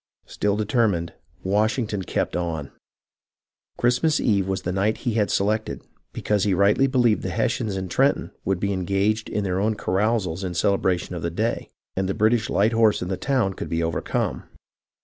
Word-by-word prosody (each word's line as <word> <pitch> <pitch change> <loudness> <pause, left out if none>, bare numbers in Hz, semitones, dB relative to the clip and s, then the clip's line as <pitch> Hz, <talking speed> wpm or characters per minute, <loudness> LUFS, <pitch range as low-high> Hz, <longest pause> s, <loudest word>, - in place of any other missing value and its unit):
Still 105 0 -1
determined, 105 -6 +1 0.3
Washington 105 +1 0
kept - - -2
on. 80 -5 -3 1.1
Christmas 125 +6 +2
Eve 100 -4 +1
was 95 0 -2
the 90 - -2
night 100 +4 +1
he 120 - +1
had 105 -2 +1
selected, 110 +2 -1 0.3
because 105 -2 0
he 100 -3 +2
rightly 100 +8 +4
believed 120 -5 +2
the 95 - -3
Hessians 110 +2 -1
in 95 0 -3
Trenton 135 +10 +1
would 95 -1 0
be 100 +1 0
engaged 100 +4 0
in 105 - -1
their 95 -1 -1
own 110 +2 +1
carousals 95 -3 0
in 90 -2 -3
celebration 95 -1 +1
of 85 - -5
the 85 - -1
day, 110 +7 -2 0.3
and 95 0 -1
the 95 - -1
British 110 +3 +2
light 105 +3 +2
horse 110 -4 +3
in 90 - -5
the 95 - 0
town 125 -5 0
could - - -6
be 85 0 0
overcome. 80 -1 -2
100 Hz, 175 wpm, -24 LUFS, 95-110 Hz, 1.1 s, rightly